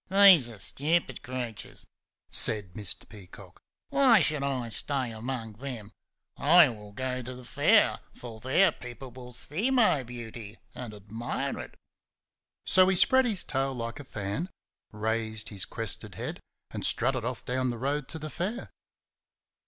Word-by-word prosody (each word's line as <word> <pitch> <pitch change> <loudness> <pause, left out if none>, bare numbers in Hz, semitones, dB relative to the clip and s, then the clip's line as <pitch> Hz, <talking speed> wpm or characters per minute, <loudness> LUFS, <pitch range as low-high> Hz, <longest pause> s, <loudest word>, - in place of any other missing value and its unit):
"These 190 -9 +8
are 115 - -10
stupid 145 - 0
creatures!" 120 -4 -5 0.5
said 105 -5 +1
Mr. 100 -1 -4
Peacock. 95 -3 -13 0.3
"Why 270 -6 +6
should 150 -3 0
I 130 -4 -2
stay 130 +1 -3
among 115 0 -5
them? 120 -5 -6 0.4
I 165 0 +6
will 105 -3 -9
go 130 +3 -3
to 125 +1 -7
the 125 - -11
Fair, - - +4 0.2
for 115 -3 -9
there 150 - +4
people 125 0 -10
will 125 0 -10
see 155 - 0
my 235 - +4
beauty 115 -3 -9 0.2
and 125 -3 -6
admire 110 +4 -4
it." - - -9 0.9
So 185 0 +6
he 190 - +3
spread 260 +8 +5
his 215 -7 +1
tail 135 0 -1
like 115 0 -5
a - - -7
fan, 105 - -4 0.4
raised 110 0 -2
his 100 -2 -2
crested 115 -2 -2
head - - -4 0.3
and - - -5
strutted 130 0 +3
off 125 +1 -4
down 130 +1 0
the 120 - -3
road 140 +3 -1
to 160 - -2
the 155 -1 -6
Fair. 205 +9 -4
125 Hz, 150 wpm, -28 LUFS, 110-150 Hz, 0.9 s, These